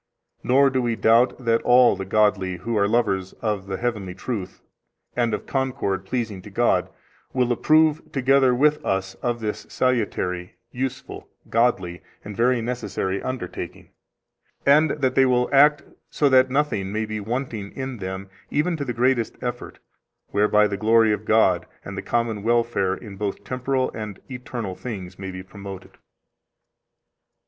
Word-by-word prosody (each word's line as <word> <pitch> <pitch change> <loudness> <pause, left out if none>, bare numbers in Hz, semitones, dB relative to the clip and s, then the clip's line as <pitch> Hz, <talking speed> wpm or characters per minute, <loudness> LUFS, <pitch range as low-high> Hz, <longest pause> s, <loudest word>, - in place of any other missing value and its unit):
Nor 135 +2 +4
do 130 0 +1
we 120 -2 0
doubt 120 +3 +3
that 115 0 +3
all 125 -2 +5
the 95 0 -5
godly 95 -2 +1
who 115 +6 -3
are 100 -1 +3
lovers 100 -5 0
of 105 -4 -3
the 95 -1 -3
heavenly 105 -6 -3
truth, 95 -3 -5 0.6
and 120 -2 +1
of 105 - -3
concord 130 -8 -2
pleasing 110 -3 -3
to - - -11
God, - - +1 0.4
will 125 -2 +1
approve, 155 +5 +3
together 135 -1 +3
with 150 +3 +2
us, 95 0 -1
of 120 -1 -1
this 105 -1 -4
salutary, 95 -8 -1 0.2
useful, 130 +1 -5 0.2
godly, 95 -8 +1 0.2
and 105 0 -7
very 120 +1 +2
necessary 115 -5 -3
undertaking, 130 -9 -6 0.8
and 150 +3 +5
that 135 -3 0
they 135 0 +4
will 125 -1 +2
act 145 +1 +5 0.3
so 145 - +2
that 130 -1 +5
nothing 130 -9 0
may 110 +1 -1
be 110 0 -4
wanting 110 -2 -4
in 130 -2 -5
them, 95 0 -5 0.2
even 160 +4 0
to 145 - -3
the 125 - -3
greatest 120 -1 +1
effort, - - -5 0.5
whereby 105 +1 +4
the 100 -1 -2
glory 110 +1 +4
of 105 +1 -4
God 95 -6 +3 0.2
and 100 - -6
the - - -4
common 115 -3 -1
welfare 115 -4 +1
in 100 -3 -10
both 100 0 -3
temporal 130 +3 -1
and 105 -3 -6
eternal 125 -5 -5
things 95 -4 -7
may 95 -1 -5
be 90 0 -7
promoted. 95 0 -10
115 Hz, 155 wpm, -23 LUFS, 100-130 Hz, 0.8 s, all